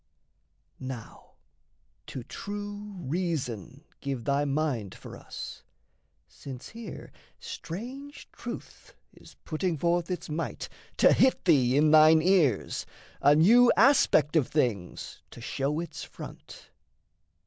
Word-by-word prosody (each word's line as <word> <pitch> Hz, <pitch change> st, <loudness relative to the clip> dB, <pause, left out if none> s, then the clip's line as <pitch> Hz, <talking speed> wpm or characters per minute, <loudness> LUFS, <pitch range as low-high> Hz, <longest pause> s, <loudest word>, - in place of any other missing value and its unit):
Now 130 Hz, -4 st, -8 dB, 0.7 s
to 130 Hz, -, -6 dB
true 205 Hz, -, -7 dB
reason 145 Hz, -, -3 dB, 0.2 s
give 135 Hz, -4 st, -4 dB
thy 140 Hz, +2 st, +1 dB
mind 140 Hz, -8 st, -1 dB
for -, -, -10 dB
us. -, -, -8 dB, 0.6 s
Since 130 Hz, -3 st, -10 dB
here 230 Hz, 0 st, -9 dB, 0.3 s
strange 255 Hz, -, -8 dB
truth -, -, -9 dB, 0.2 s
is -, -, -17 dB
putting 165 Hz, +1 st, -1 dB
forth 170 Hz, +2 st, 0 dB
its 180 Hz, -, -4 dB
might 160 Hz, +2 st, -4 dB, 0.3 s
To -, -, +6 dB
hit 260 Hz, -, +3 dB
thee 135 Hz, -7 st, +4 dB
in 150 Hz, +1 st, +4 dB
thine 155 Hz, 0 st, +7 dB
ears, 170 Hz, -, +2 dB, 0.3 s
a 145 Hz, +1 st, +6 dB
new 235 Hz, +10 st, +6 dB
aspect 200 Hz, -, +4 dB
Of 150 Hz, -6 st, +3 dB
things 115 Hz, -, -2 dB
to -, -, -12 dB
show 135 Hz, +5 st, -2 dB
its 170 Hz, -2 st, -6 dB
front. -, -, -11 dB
155 Hz, 115 wpm, -28 LUFS, 135-185 Hz, 0.7 s, thine